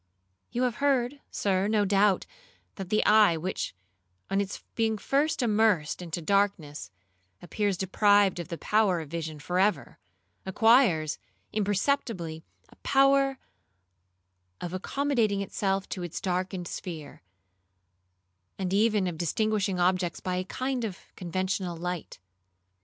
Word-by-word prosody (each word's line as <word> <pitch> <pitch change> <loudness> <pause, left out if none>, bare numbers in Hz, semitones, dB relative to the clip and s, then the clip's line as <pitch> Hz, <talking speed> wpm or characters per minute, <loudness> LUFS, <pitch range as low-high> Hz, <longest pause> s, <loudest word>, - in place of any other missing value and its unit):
You 245 - -1
have 245 -3 0
heard, 280 -1 +1
Sir, 195 -1 0
no 210 -1 +2
doubt, 200 -1 +3 0.5
that 190 -3 -7
the 215 - +2
eye 210 -6 +6
which, 175 - -4 0.6
on 195 +1 +2
its 200 0 -5
being 220 -1 0
first 280 +5 0
immersed 210 -9 +2
into 170 -1 -5
darkness, 195 -6 0 0.5
appears 200 +1 -1
deprived 200 0 +3
of 170 - -5
the 170 -2 -5
power 210 -3 +2
of 155 -2 -8
vision 160 -2 -4
for 180 +5 -2
ever, 205 +2 0 0.4
acquires, 190 - +3 0.3
imperceptibly, 205 - -1 0.3
a - - -20
power 275 0 +3 1.2
of 175 0 -5
accommodating 225 0 0
itself 195 -1 -1
to 185 - -4
its 175 -2 -5
darkened 185 -1 -2
sphere, 160 -6 -7 1.4
and 190 -1 -2
even 210 -1 +3
of 170 -3 -4
distinguishing 200 +2 0
objects 180 0 +1
by 180 -1 -2
a 185 - -1
kind 255 +5 -3
of 200 -5 -4 0.2
conventional 185 0 -2
light. 175 0 -5
195 Hz, 125 wpm, -28 LUFS, 180-220 Hz, 1.4 s, eye